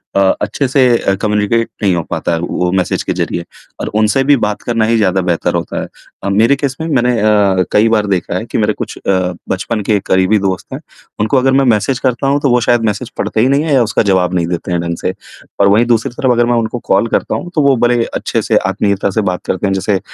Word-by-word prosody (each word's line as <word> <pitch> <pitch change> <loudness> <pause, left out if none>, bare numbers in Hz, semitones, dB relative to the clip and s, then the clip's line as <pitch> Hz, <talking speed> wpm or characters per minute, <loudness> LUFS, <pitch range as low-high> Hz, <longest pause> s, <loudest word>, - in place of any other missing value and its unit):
अ, - - +3 0.2
अच्छे 110 +7 -1
से 130 -1 +3
अ, 95 - 0
कम्यूनिकेट 105 +2 0
नहीं 95 -3 +3
हो 85 - -2
पाता - - -2
है 80 - -1
वो 90 +1 -2
मैसेज 95 -1 -1
के - - -2
ज़रिए 85 - -3 0.4
और - - -4
उनसे 110 +5 +2
भी 145 +1 +4
बात 105 0 -1
करना 115 -2 0
ही 115 +1 +2
ज़्यादा 95 -3 +1
बेहतर 90 -2 -1
होता - - -3
है। - - -6 0.4
अ, 100 - -1
मेरे 110 +7 +3
केस 140 -1 -3
में 160 - -3
मैंने 125 -5 +2
अ, 100 -3 +3
कई 110 +2 +3
बार 110 -2 +2
देखा 90 -2 -1
है 110 - -5
कि - - -4
मेरे 105 -1 +1
कुछ - - -6
अ, 90 -2 -1 0.2
बचपन 105 +4 -2
के 105 -2 +3
करीबी 95 +3 +2
दोस्त 95 -2 -3
हैं, - - -5 0.4
उनको 110 +6 +1
अगर 130 +1 +3
मैं 135 0 +3
मैसेज 120 +3 +1
करता 130 0 -1
हूँ, 140 +1 +2
तो 140 - +1
वो 125 0 +3
शायद 120 0 +2
मैसेज 105 +3 -2
पढ़ते 110 - -1
ही 125 - +3
नहीं 140 +2 +2
है 155 -3 0
या 130 - +4
उसका 105 -2 0
जवाब 95 -2 +2
नहीं 85 -2 0
देते 90 +1 -4
हैं 85 - 0
ढंग 85 0 -3
से - - -1 0.5
और 100 - +5
वही 110 +4 +4
दूसरी 115 -2 +1
तरफ़ 125 +1 0
अगर 120 0 +3
मैं 120 - +1
उनको 115 +1 -2
कॉल 100 +4 +3
करता - - -1
हूँ, 175 - -5
तो 155 - +3
वो 135 - +4
बड़े 120 -1 +2
अच्छे - - -1
से - - +1
आत्मीयता 100 +1 0
से 110 +3 0
बात 90 - -5
करते 95 +2 -1
हैं 95 - 0
जैसे 95 +1 0
अ, - - -6
105 Hz, 255 wpm, -14 LUFS, 95-120 Hz, 0.5 s, और